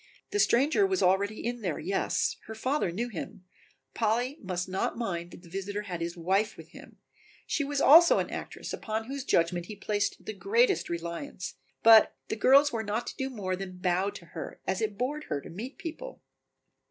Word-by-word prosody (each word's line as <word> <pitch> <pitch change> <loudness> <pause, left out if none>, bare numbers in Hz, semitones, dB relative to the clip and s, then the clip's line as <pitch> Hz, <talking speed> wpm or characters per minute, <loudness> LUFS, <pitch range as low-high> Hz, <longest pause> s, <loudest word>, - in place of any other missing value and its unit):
"The 410 - 0
stranger 290 +6 +4
was 380 -1 0
already 200 +4 +1
in 240 0 -2
there, 175 -7 -2
yes, 195 +1 0
her 220 - -6
father 255 - 0
knew 230 +8 -2
him, 185 -2 -7 0.5
Polly 240 +6 0
must 180 -2 -3
not 190 +4 -2
mind 175 -7 -3
that 175 - -13
the 170 - -14
visitor 200 +3 -4
had 180 -5 -5
his 170 +1 -3
wife 190 +5 +1
with - - -12
him, - - -14 0.5
she 300 - 0
was 285 0 -2
also 330 +5 +8
an - - -1
actress - - -6
upon 220 0 -3
whose 270 +2 -5
judgment 175 -5 +1
he 210 - -7
placed 205 0 -2
the 215 - -4
greatest 210 +6 +2
reliance, 170 +2 -5 0.3
but 225 -1 +8
the - - -1
girls 275 +6 +5
were 225 - -1
not 220 +2 -2
to - - -6
do 265 -1 -2
more 195 -7 -3
than 185 -1 -7
bow 180 +2 +1
to 200 -4 -10
her, 165 -1 -8
as 190 +3 -1
it 215 -2 -2
bored 290 +6 -2
her - - -2
to - - -11
meet 230 +10 -7
people." 430 +10 -7
210 Hz, 195 wpm, -29 LUFS, 185-245 Hz, 0.5 s, also